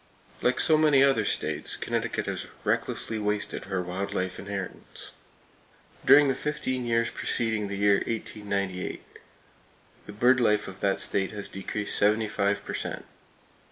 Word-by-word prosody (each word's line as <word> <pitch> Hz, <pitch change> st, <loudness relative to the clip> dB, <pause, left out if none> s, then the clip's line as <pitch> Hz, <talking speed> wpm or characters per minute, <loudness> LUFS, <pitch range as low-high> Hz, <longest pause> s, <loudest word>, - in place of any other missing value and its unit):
Like 125 Hz, -, +2 dB
so 155 Hz, -1 st, +4 dB
many 150 Hz, -3 st, +5 dB
other 135 Hz, -1 st, +3 dB
states, -, -, -1 dB
Connecticut -, -, -2 dB
has -, -, -4 dB, 0.2 s
recklessly 110 Hz, -, -1 dB
wasted 105 Hz, 0 st, -2 dB
her 95 Hz, -2 st, -2 dB
wild 95 Hz, +3 st, -4 dB
life 95 Hz, -1 st, -2 dB
inheritance. 100 Hz, -1 st, -7 dB, 0.9 s
During 145 Hz, 0 st, +7 dB
the 135 Hz, -, +2 dB
fifteen 130 Hz, -4 st, -2 dB
years 115 Hz, 0 st, +1 dB
preceding 110 Hz, -3 st, -1 dB
the 100 Hz, 0 st, -4 dB
year 100 Hz, 0 st, +4 dB
1898, 100 Hz, -4 st, -3 dB, 1.0 s
the 105 Hz, -, -9 dB
bird 125 Hz, +4 st, +4 dB
life 105 Hz, -2 st, +2 dB
of 95 Hz, 0 st, -9 dB
that 100 Hz, -1 st, +1 dB
state 95 Hz, -1 st, 0 dB
had 105 Hz, -1 st, -7 dB
decreased 105 Hz, +2 st, -4 dB
75 105 Hz, -1 st, +1 dB
per -, -, -5 dB
cent. -, -, -4 dB
105 Hz, 140 wpm, -27 LUFS, 100-120 Hz, 1.0 s, During